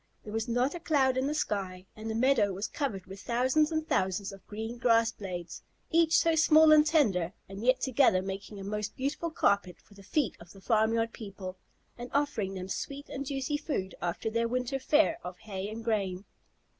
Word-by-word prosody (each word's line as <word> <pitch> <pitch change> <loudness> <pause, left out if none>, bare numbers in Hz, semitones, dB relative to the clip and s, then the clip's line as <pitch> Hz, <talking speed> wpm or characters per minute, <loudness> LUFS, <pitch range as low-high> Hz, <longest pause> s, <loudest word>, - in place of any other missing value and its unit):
There 210 - -8
was 225 +1 -1
not 245 +3 +1
a 345 - -5
cloud 275 -6 +2
in 260 +1 0
the 300 - -1
sky, 190 -9 -2
and 220 +1 -6
the 220 - -2
meadow 230 -5 +3
was 195 +3 -3
covered 215 -11 -3
with 195 +1 -10
thousands 260 +7 +2
and 315 0 -1
thousands 190 +1 0
of 195 -1 -14
green 225 +3 -6
grass 230 -1 +4
blades, 180 -4 -7 0.3
each 330 -1 +4
so 330 - +3
small 315 0 +6
and 305 -1 +8
tender, 210 - +2
and 195 +2 -8
yet 255 +1 +3
together 250 -8 +3
making 195 +2 -6
a - - -7
most 210 +1 -4
beautiful 285 +5 -2
carpet 200 - +1
for - - -21
the 200 - -14
feet 215 - 0
of 170 0 -14
the 195 - -14
farmyard 225 +2 +1
people, 195 -3 -8 0.4
and 245 +1 -6
offering 235 -10 0
them 185 0 -5
sweet 280 +8 -5
and 275 0 -5
juicy 275 +1 -1
food 285 - -3
after 175 +5 -2
their 230 +1 +1
winter 250 +2 -1
fare 310 +4 +3
of 180 0 -7
hay 195 0 -5
and 225 +1 -7
grain. 200 -4 -1
225 Hz, 200 wpm, -30 LUFS, 195-275 Hz, 0.4 s, and